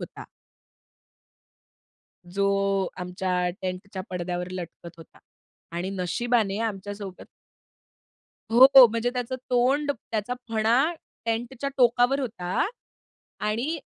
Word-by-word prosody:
होता. -, -, -8 dB, 2.1 s
जो 195 Hz, -1 st, +2 dB
आमच्या 180 Hz, 0 st, -1 dB
टेंटच्या 185 Hz, +1 st, -4 dB
पडद्यावर 180 Hz, 0 st, -3 dB
लटकत 170 Hz, -1 st, -8 dB
होता 165 Hz, -, -15 dB, 0.6 s
आणि 180 Hz, +2 st, -2 dB
नशिबाने 200 Hz, +3 st, 0 dB
आमच्यासोबत 205 Hz, -2 st, -5 dB, 1.3 s
हो. 265 Hz, +1 st, +10 dB
म्हणजे 230 Hz, +2 st, -1 dB
त्याचं 250 Hz, 0 st, -3 dB
तोंड, 265 Hz, +4 st, +2 dB, 0.2 s
त्याचा 220 Hz, +3 st, -1 dB
फणा 230 Hz, +8 st, +2 dB, 0.3 s
टेंटच्या 240 Hz, +4 st, -2 dB
टोकावर 245 Hz, +2 st, +4 dB
होता 190 Hz, -8 st, -1 dB, 0.8 s
आणि 240 Hz, +10 st, -1 dB
215 Hz, 85 wpm, -26 LUFS, 185-245 Hz, 2.1 s, हो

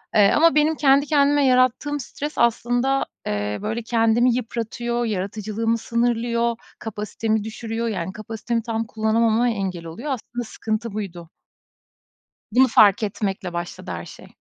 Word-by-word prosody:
Eee, 205 Hz, -2 st, +6 dB
ama 330 Hz, +1 st, +5 dB
benim 305 Hz, +1 st, +3 dB
kendi 280 Hz, -1 st, +4 dB
kendime 290 Hz, -1 st, +3 dB
yarattığım 255 Hz, +3 st, +2 dB
stres 290 Hz, +3 st, -6 dB
aslında, 245 Hz, +3 st, +2 dB, 0.2 s
eee, 105 Hz, 0 st, -2 dB
böyle, 220 Hz, +3 st, -3 dB
kendimi 230 Hz, +1 st, +3 dB
yıpratıyor, 235 Hz, 0 st, -2 dB
yaratıcılığımı 215 Hz, +2 st, -2 dB
sınırlıyor, 235 Hz, 0 st, 0 dB, 0.2 s
kapasitemi 220 Hz, 0 st, -2 dB
düşürüyor. 225 Hz, +1 st, -4 dB
Yani, 190 Hz, -4 st, -3 dB
kapasitemi 225 Hz, +2 st, -3 dB
tam 225 Hz, 0 st, -2 dB
kullanamama 225 Hz, +2 st, +2 dB
engel 190 Hz, -6 st, -3 dB
oluyor. 230 Hz, -, -5 dB
Aslında 240 Hz, -1 st, -4 dB
sıkıntı 220 Hz, 0 st, -4 dB
buydu. 180 Hz, -6 st, -6 dB, 1.2 s
Bunu 260 Hz, +4 st, +5 dB
fark 210 Hz, -3 st, +5 dB
etmekle 195 Hz, -3 st, -3 dB
başladı 175 Hz, 0 st, -5 dB
her -, -, -5 dB
şey. -, -, -12 dB
230 Hz, 130 wpm, -22 LUFS, 215-245 Hz, 1.2 s, Eee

